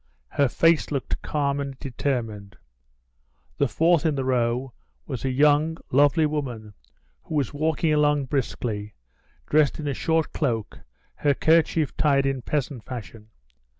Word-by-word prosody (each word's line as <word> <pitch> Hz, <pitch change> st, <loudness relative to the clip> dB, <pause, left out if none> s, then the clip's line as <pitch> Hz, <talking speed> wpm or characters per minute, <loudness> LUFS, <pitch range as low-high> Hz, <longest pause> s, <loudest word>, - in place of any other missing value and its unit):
Her 140 Hz, -, +2 dB
face 165 Hz, +5 st, +3 dB
looked 140 Hz, -3 st, -3 dB
calm 140 Hz, -2 st, -1 dB
and 140 Hz, -2 st, -5 dB
determined. 115 Hz, -7 st, -4 dB, 1.0 s
The 140 Hz, -, +3 dB
fourth 165 Hz, +7 st, +2 dB
in 155 Hz, -3 st, +1 dB
the 135 Hz, -1 st, -2 dB
row 125 Hz, 0 st, 0 dB, 0.3 s
was 125 Hz, -, -5 dB
a 135 Hz, -, 0 dB
young, 150 Hz, +4 st, +3 dB
lovely 145 Hz, +4 st, +4 dB
woman 125 Hz, -8 st, -4 dB, 0.5 s
who 160 Hz, -, -6 dB
was 140 Hz, -4 st, 0 dB
walking 155 Hz, +1 st, +1 dB
along 150 Hz, -2 st, +2 dB
briskly, 115 Hz, -6 st, -3 dB, 0.5 s
dressed 150 Hz, -1 st, +2 dB
in 150 Hz, -, -4 dB
a 140 Hz, -, 0 dB
short 160 Hz, +3 st, 0 dB
cloak, 115 Hz, -8 st, -2 dB, 0.4 s
her 145 Hz, -1 st, +2 dB
kerchief 160 Hz, -1 st, +2 dB
tied 140 Hz, -3 st, +3 dB
in 135 Hz, -1 st, -1 dB
peasant 140 Hz, -3 st, -3 dB
fashion. 115 Hz, -3 st, -9 dB
140 Hz, 140 wpm, -25 LUFS, 125-150 Hz, 1.0 s, lovely